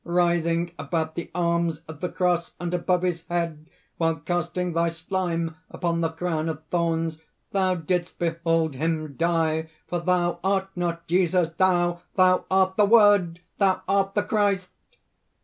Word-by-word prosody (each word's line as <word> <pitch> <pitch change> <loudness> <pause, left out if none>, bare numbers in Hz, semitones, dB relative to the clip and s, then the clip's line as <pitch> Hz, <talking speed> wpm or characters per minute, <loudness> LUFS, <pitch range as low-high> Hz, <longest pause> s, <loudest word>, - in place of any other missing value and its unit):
"Writhing 170 -1 +1
about 160 +2 -2
the 170 +1 -5
arms 170 -2 0
of 155 -2 -9
the 180 - -1
cross, 175 -2 0
and 175 0 -3
above 180 0 +1
his 175 -2 -1
head, 165 -3 -2 0.3
while 165 -1 +1
casting 175 +3 -2
thy 170 +1 +2
slime 165 -1 -2
upon 170 -1 -1
the 165 - +1
crown 160 -1 -2
of 155 -1 -5
thorns, 165 -2 0 0.3
thou 190 -2 +2
didst 175 +1 -2
behold 165 -2 0
him 155 +1 -2
die! 160 -1 +1 0.2
For 175 - -2
thou 175 0 +1
art 195 0 +1
not 170 -1 -2
Jesus, 175 -1 +2
thou! 175 0 +1
thou 185 -1 +4
art 190 0 +2
the 210 - +6
Word! 205 -6 +5 0.2
thou 195 -2 +2
art 195 0 +1
the - - +2
Christ!" 200 -4 +1
170 Hz, 150 wpm, -25 LUFS, 165-180 Hz, 0.3 s, the